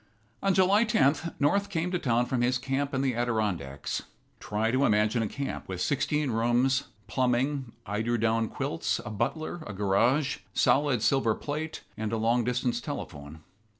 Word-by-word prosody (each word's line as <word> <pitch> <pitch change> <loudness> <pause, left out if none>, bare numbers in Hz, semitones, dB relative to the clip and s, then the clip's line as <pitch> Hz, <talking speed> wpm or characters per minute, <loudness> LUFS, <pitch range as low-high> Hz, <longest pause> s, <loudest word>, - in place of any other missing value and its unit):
On 195 -1 +2
July 195 +3 +5
the 220 - 0
10th, 145 +4 +2
North 200 +8 +2
came 175 0 -1
to 180 - 0
town 120 -3 +2
from 125 0 -1
his 125 +1 +2
camp 135 +2 -2
in 130 - 0
the 130 -2 +1
Adirondacks. 105 - -2 0.4
Try 110 +2 -1
to 130 +3 +2
imagine 105 0 +3
a 110 - 0
camp 140 +5 -5
with 95 -1 -5
sixteen 150 - 0
rooms, 120 +4 +2 0.2
plumbing, 130 0 0
eiderdown 115 +1 0
quilts, - - -2
a - - -5
butler, 145 - -2
a 100 - -6
garage, 115 +9 +2 0.2
solid 135 -5 +3
silver 115 -2 +3
plate, 155 +2 -5
and 110 -1 -2
a 115 - 0
long 115 +2 +2
distance 125 0 0
telephone. 75 +2 -7
125 Hz, 160 wpm, -28 LUFS, 110-145 Hz, 0.4 s, July